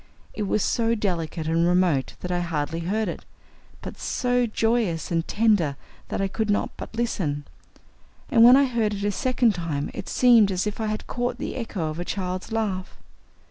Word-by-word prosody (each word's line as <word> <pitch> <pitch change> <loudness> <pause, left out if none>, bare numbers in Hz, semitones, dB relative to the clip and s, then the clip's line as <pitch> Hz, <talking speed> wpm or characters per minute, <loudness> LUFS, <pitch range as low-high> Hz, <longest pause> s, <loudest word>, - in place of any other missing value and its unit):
It 210 -2 -3
was 210 - +1
so 230 -1 +1
delicate 170 -6 -2
and 165 +1 +2
remote 175 -6 +2
that 180 - -4
I 175 - +1
hardly 165 -1 -2
heard 205 +6 -1
it, - - -5 0.6
but - - -8
so 245 -1 0
joyous 220 -8 0
and 165 -1 0
tender 205 -10 +2 0.3
that - - -3
I 195 - +1
could 215 +2 -2
not 205 - +1
but - - -9
listen, 165 -11 -2 0.8
and 235 -5 +5
when 245 +2 +9
I 280 - +5
heard 230 -5 0
it 200 - -5
a 205 - +1
second 245 +1 +2
time 165 -5 -3
it - - -6
seemed 235 -5 +5
as 185 +1 -1
if 210 +1 -3
I 215 -1 -1
caught 245 +2 -3
the - - -5
echo 200 -9 -3
of 155 - -7
a - - -1
child's 185 +1 -4
laugh. 200 -5 -2
200 Hz, 185 wpm, -24 LUFS, 170-225 Hz, 0.8 s, when